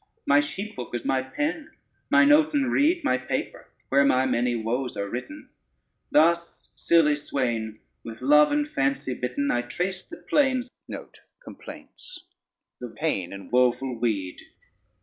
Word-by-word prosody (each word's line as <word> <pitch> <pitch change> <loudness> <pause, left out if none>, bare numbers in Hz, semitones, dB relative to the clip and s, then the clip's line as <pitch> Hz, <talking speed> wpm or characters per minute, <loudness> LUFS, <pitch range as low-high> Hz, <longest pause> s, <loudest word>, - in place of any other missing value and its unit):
My 140 +1 +5
sheephook 145 - -5
is 120 - -4
my 130 -1 +1
pen, 295 - -3 0.4
mine 295 -1 +5
oaten 295 -3 +3
reed 330 +5 +2
My 130 - +1
paper, 130 - -4 0.2
where 140 +1 +4
my 130 -1 +3
many 120 -1 +1
woes 120 +3 -2
are 100 0 -2
written. 125 +4 -7 0.6
Thus 170 +2 +2
silly 160 -3 +3
swain, 120 -7 -3 0.2
with 115 -1 -9
love 150 +3 +5
and 295 0 +1
fancy 135 - -1
bitten, 125 +3 -2
I 120 - +1
trace 180 +9 -3
the 335 - -12
plains 265 -3 +1 0.8
of 125 - -10
pain 110 - -2
in 100 -1 -10
woeful 125 0 +1
weed. 100 -6 -2
135 Hz, 130 wpm, -25 LUFS, 120-185 Hz, 0.8 s, My